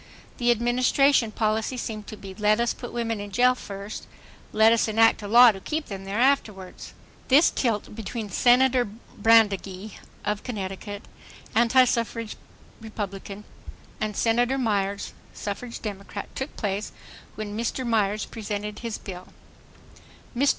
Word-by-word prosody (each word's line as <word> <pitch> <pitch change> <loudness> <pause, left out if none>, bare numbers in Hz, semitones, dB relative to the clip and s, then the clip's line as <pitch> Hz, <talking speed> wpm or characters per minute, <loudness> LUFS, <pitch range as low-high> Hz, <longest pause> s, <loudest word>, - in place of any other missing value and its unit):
The 240 -1 +2
Administration 240 +1 +3
policy 220 +3 -1
seemed 215 -3 -5
to 215 - -8
be 195 -2 -9
"Let 210 +2 +2
us 235 0 +1
put 245 - -8
women 230 -2 -2
in 205 0 -6
jail 250 +5 +4
first—let 215 +1 -2
us 230 - +2
enact 225 +1 +4
a 205 - -6
law 240 +3 +8
to 195 - -9
keep 305 +9 -4
them 195 -1 -6
there 195 +2 -3
afterwards," 220 -8 0 0.3
This 285 +5 +6
tilt 225 -6 -1
between 220 0 -5
Senator 250 +3 +4 0.3
Brandegee, 205 -2 +2 0.3
of 210 0 -1
Connecticut, 205 -2 -6 0.5
antisuffrage 235 -1 +2 0.5
Republican, 205 -2 -6 0.6
and 215 -3 -3
Senator 240 +3 +2
Myers, 200 -5 -1 0.2
suffrage 230 +4 -5
Democrat, 200 -2 -7
took 265 +2 -5
place 205 0 -2 0.4
when 210 -1 -5
Mr. 235 +3 -2
Myer's 215 -3 +1
presented 210 -1 -5
his 230 -2 -4
bill: 180 -2 -9 1.1
MR. 275 +4 +3
220 Hz, 130 wpm, -25 LUFS, 205-240 Hz, 1.1 s, law